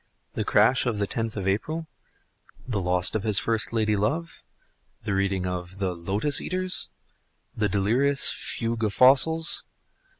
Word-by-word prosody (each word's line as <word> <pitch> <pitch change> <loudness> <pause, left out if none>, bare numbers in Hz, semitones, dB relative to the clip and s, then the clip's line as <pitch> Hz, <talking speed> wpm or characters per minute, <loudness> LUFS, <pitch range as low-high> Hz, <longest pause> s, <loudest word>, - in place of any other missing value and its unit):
the - - -2
crash 130 0 +3
of 115 -4 -1
the 100 - 0
tenth 115 +1 -4
of 95 -1 -3
April? 155 +12 -2 0.8
the 110 -6 -2
loss 90 0 +1
of 110 - -1
his 105 -1 +1
first 115 -2 0
lady 110 -2 +1
love? 155 +12 -2 0.6
the 105 -2 -2
reading 95 -1 0
of 90 0 -5
the 95 -2 -2
"Lotus 100 - -1
eaters?" 185 0 0 0.7
the 105 -1 0
delirious 125 +8 +2
Fugue 115 -1 -3
of 105 -2 -1
Fossils? 160 +5 +5
110 Hz, 145 wpm, -25 LUFS, 100-130 Hz, 0.8 s, Fossils